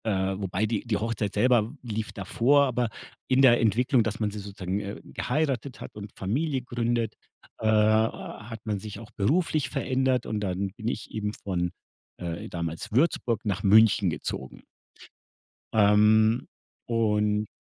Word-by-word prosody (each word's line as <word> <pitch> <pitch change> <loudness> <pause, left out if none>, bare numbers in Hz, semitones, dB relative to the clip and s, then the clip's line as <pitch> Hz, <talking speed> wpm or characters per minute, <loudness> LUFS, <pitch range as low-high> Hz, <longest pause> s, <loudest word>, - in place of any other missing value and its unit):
Äh, 95 -2 0
wobei 95 +1 -1
die 110 -1 -1
die 110 -3 0
Hochzeit 110 -2 -2
selber 120 +1 +4
w 115 +7 -8 0.2
lief 110 0 -3
davor, 125 +9 +3
aber 125 -3 0 0.4
in 130 +1 +3
der 120 -2 +7
Entwicklung, 120 +3 +3
dass 110 +2 -3
man 105 -2 0
sie 105 - -6
sozusagen, 100 -1 -4
äh, 100 0 -6
geheiratet 135 -2 -2
hat - - -9
und 105 -1 -8
Familie 130 +7 -1
gründet, 120 -2 -1 0.5
äh, 110 - -1
hat 110 +1 +1
man 105 -2 -1
sich 105 0 -8
auch 115 +1 -12
beruflich 155 - +1
verändert 130 -1 0
und 110 - -2
dann 95 -1 -2
bin 110 - -6
ich 110 - -4
eben 105 -1 -3
von, 90 -4 -2 0.5
äh, 85 -1 -5
damals 85 -1 -4
Würzburg 120 -2 +1
nach 100 -2 -1
München 105 -1 +5
gezogen. 75 -4 -5 1.1
Ähm, 110 +3 +4 0.4
und 105 -2 +1
110 Hz, 150 wpm, -27 LUFS, 100-120 Hz, 1.1 s, der